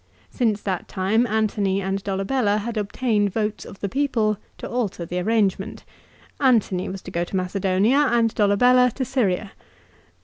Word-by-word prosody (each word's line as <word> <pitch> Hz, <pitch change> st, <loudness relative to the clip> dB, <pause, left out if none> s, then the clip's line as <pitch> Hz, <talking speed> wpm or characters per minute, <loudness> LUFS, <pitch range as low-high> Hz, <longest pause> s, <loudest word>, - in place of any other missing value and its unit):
Since 215 Hz, -4 st, 0 dB
that 190 Hz, -3 st, -3 dB
time 215 Hz, +6 st, +1 dB
Antony 210 Hz, -3 st, 0 dB
and 195 Hz, 0 st, -2 dB
Dolabella 205 Hz, +3 st, 0 dB
had 235 Hz, +2 st, -4 dB
obtained 210 Hz, 0 st, 0 dB
votes 215 Hz, +1 st, -2 dB
of 195 Hz, -, -12 dB
the 200 Hz, -, -1 dB
people 230 Hz, -4 st, 0 dB, 0.2 s
to -, -, -6 dB
alter 220 Hz, -8 st, -2 dB
the 180 Hz, +2 st, -3 dB
arrangement. 200 Hz, 0 st, 0 dB, 0.6 s
Antony 225 Hz, -9 st, +2 dB
was 190 Hz, 0 st, -7 dB
to 185 Hz, -, -8 dB
go 170 Hz, -1 st, -1 dB
to 175 Hz, -, -6 dB
Macedonia, 195 Hz, +8 st, +2 dB
and 230 Hz, -2 st, +2 dB
Dolabella 245 Hz, +5 st, +4 dB
to 260 Hz, -, -2 dB
Syria. 210 Hz, -6 st, 0 dB
205 Hz, 150 wpm, -23 LUFS, 195-235 Hz, 0.6 s, Dolabella